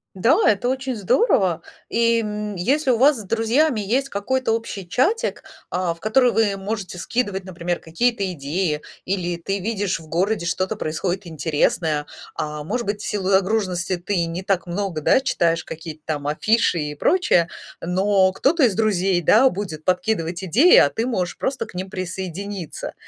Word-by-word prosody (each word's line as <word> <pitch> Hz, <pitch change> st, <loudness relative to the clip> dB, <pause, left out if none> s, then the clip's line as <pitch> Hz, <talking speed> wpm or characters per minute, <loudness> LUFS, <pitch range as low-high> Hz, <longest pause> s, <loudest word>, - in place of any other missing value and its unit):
Да, 230 Hz, -, +3 dB
это 220 Hz, +2 st, +3 dB
очень 260 Hz, 0 st, -2 dB
здорово. 190 Hz, -, +2 dB, 0.3 s
И, 230 Hz, 0 st, +2 dB
м, 210 Hz, -1 st, -4 dB
если 265 Hz, -, +1 dB
у 240 Hz, -, +2 dB
вас 280 Hz, +3 st, +5 dB
с -, -, -9 dB
друзьями 230 Hz, +6 st, +1 dB
есть 250 Hz, +7 st, 0 dB
какой-то 255 Hz, +4 st, -1 dB
общий 225 Hz, -4 st, -3 dB
чатик, 415 Hz, -, 0 dB, 0.3 s
а, 180 Hz, -2 st, -1 dB
в 165 Hz, -, -20 dB
который 245 Hz, +3 st, +3 dB
вы 210 Hz, -3 st, +2 dB
можете 195 Hz, -2 st, -5 dB
скидывать, 200 Hz, -1 st, -2 dB
например, 175 Hz, -1 st, -3 dB
какие-то 200 Hz, +4 st, 0 dB
идеи 150 Hz, +1 st, -2 dB, 0.2 s
или 175 Hz, -2 st, -2 dB
ты 195 Hz, +4 st, -3 dB
видишь, 200 Hz, -3 st, -2 dB
в 160 Hz, -, -14 dB
городе 185 Hz, +3 st, 0 dB
что-то 185 Hz, +4 st, -1 dB
происходит 180 Hz, +2 st, -3 dB
интересное, 155 Hz, 0 st, 0 dB, 0.3 s
а, 150 Hz, -1 st, -4 dB
может 235 Hz, +7 st, -2 dB
быть, 205 Hz, +1 st, -3 dB
в -, -, -5 dB
силу 195 Hz, -3 st, -2 dB
загруженности 190 Hz, -2 st, +1 dB
ты 175 Hz, 0 st, -1 dB
не 165 Hz, +3 st, -5 dB
так 185 Hz, -2 st, 0 dB
много, 175 Hz, -2 st, -2 dB
да, 260 Hz, -, +3 dB
читаешь 170 Hz, -10 st, +1 dB
какие-то 160 Hz, -1 st, -8 dB
там 145 Hz, -2 st, -3 dB
афиши 180 Hz, +4 st, +2 dB
и 150 Hz, -1 st, -3 dB
прочее, 235 Hz, -, +3 dB, 0.3 s
но 190 Hz, +2 st, +2 dB
кто-то 295 Hz, -, +2 dB
из 225 Hz, -7 st, +4 dB
друзей, 195 Hz, -4 st, +1 dB
да, 230 Hz, +10 st, +5 dB
будет 180 Hz, -6 st, -6 dB
подкидывать 180 Hz, -1 st, 0 dB
идеи, 240 Hz, -, +5 dB
а 145 Hz, -, +7 dB
ты 225 Hz, +10 st, -2 dB
можешь 185 Hz, -8 st, -2 dB
просто 265 Hz, 0 st, -2 dB
к -, -, -14 dB
ним 185 Hz, +1 st, -5 dB
присоединиться. 185 Hz, -1 st, -5 dB
195 Hz, 165 wpm, -22 LUFS, 175-225 Hz, 0.3 s, а